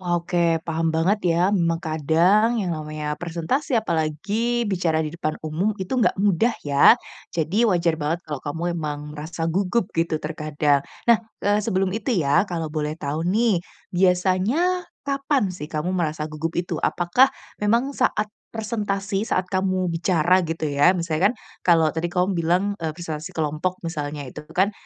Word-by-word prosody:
Wah 175 Hz, -1 st, -1 dB
oke, 170 Hz, -1 st, +1 dB
paham 165 Hz, 0 st, 0 dB
banget 180 Hz, +6 st, +2 dB, 0.2 s
ya, 170 Hz, -, +1 dB
memang 170 Hz, -4 st, +1 dB
kadang 175 Hz, +9 st, +3 dB
yang 180 Hz, -3 st, -1 dB
namanya 150 Hz, -1 st, -4 dB
presentasi 175 Hz, -, -2 dB
apalagi 215 Hz, +5 st, 0 dB
bicara 170 Hz, -4 st, +1 dB
di 155 Hz, -, -3 dB
depan 155 Hz, -2 st, -2 dB
umum 170 Hz, +8 st, -1 dB
itu 185 Hz, -, -5 dB
enggak 230 Hz, -, +3 dB
mudah 205 Hz, +4 st, +2 dB
ya, 140 Hz, -1 st, +6 dB, 0.4 s
jadi 175 Hz, +9 st, +2 dB
wajar 170 Hz, -5 st, +2 dB
banget 155 Hz, +3 st, -1 dB
kalau 150 Hz, -2 st, -5 dB
kamu 160 Hz, +3 st, -4 dB, 0.2 s
emang 150 Hz, -1 st, -4 dB
merasa 160 Hz, +2 st, -4 dB
gugup 195 Hz, +4 st, 0 dB
gitu 165 Hz, -2 st, 0 dB
terkadang. 150 Hz, -2 st, 0 dB, 0.2 s
Nah, 235 Hz, -2 st, +7 dB, 0.2 s
eee, 205 Hz, +1 st, +3 dB
sebelum 190 Hz, -1 st, +1 dB
itu 225 Hz, +4 st, -1 dB
ya 160 Hz, +2 st, +3 dB
kalau 165 Hz, -3 st, -3 dB
boleh 150 Hz, -1 st, -2 dB
tahu 155 Hz, +2 st, -3 dB
nih, 215 Hz, 0 st, +3 dB, 0.3 s
biasanya 190 Hz, -, +2 dB, 0.2 s
kapan 275 Hz, -5 st, 0 dB
sih 175 Hz, -5 st, -6 dB
kamu 155 Hz, +3 st, -2 dB
merasa 155 Hz, -4 st, -1 dB
gugup 155 Hz, +2 st, -3 dB
itu, 175 Hz, +1 st, -2 dB
apakah 175 Hz, +10 st, +3 dB, 0.3 s
memang 235 Hz, +6 st, +2 dB
saat 215 Hz, -6 st, 0 dB, 0.2 s
presentasi 205 Hz, -2 st, -2 dB
saat 185 Hz, -, +1 dB
kamu 185 Hz, -2 st, 0 dB
bicara 175 Hz, +1 st, +3 dB
gitu 165 Hz, -2 st, -3 dB
ya, 145 Hz, +7 st, +4 dB
misalnya 170 Hz, +2 st, +1 dB
kan 245 Hz, -, -7 dB, 0.3 s
kalau 165 Hz, -3 st, +4 dB
tadi 165 Hz, +1 st, -2 dB
kamu 180 Hz, +2 st, +1 dB
bilang, 180 Hz, +4 st, +1 dB
eee, 160 Hz, -1 st, -2 dB
presentasi 160 Hz, -3 st, -6 dB
kelompok 160 Hz, +4 st, -1 dB
misalnya 150 Hz, -3 st, -4 dB
itu 135 Hz, +3 st, -8 dB, 0.2 s
kan 195 Hz, +3 st, +3 dB
175 Hz, 160 wpm, -23 LUFS, 155-200 Hz, 0.4 s, Nah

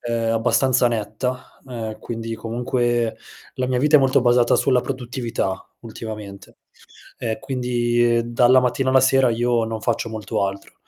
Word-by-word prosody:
ehm, 115 Hz, -1 st, -1 dB
abbastanza 125 Hz, +2 st, +2 dB
netta, 115 Hz, +3 st, -4 dB
ehm, 110 Hz, -3 st, -6 dB
quindi 115 Hz, -1 st, -5 dB
comunque 120 Hz, 0 st, -1 dB, 0.4 s
la 130 Hz, -, -2 dB
mia 125 Hz, -1 st, 0 dB
vita 150 Hz, +3 st, +5 dB
è -, -, +7 dB
molto 135 Hz, -1 st, +3 dB
basata 120 Hz, -1 st, +3 dB
sulla 130 Hz, -2 st, +2 dB
produttività 120 Hz, -7 st, -4 dB
ultimamente, 110 Hz, -3 st, -9 dB, 0.6 s
e 115 Hz, +1 st, -3 dB
quindi 120 Hz, -2 st, +1 dB
dalla 125 Hz, +2 st, +5 dB
mattina 130 Hz, +1 st, 0 dB
alla 130 Hz, 0 st, +5 dB
sera 135 Hz, -1 st, +4 dB
io 120 Hz, 0 st, +1 dB
non 110 Hz, -1 st, -5 dB
faccio 115 Hz, 0 st, -1 dB
molto 110 Hz, -2 st, -2 dB
altro, 100 Hz, 0 st, -7 dB
120 Hz, 145 wpm, -21 LUFS, 115-125 Hz, 0.6 s, è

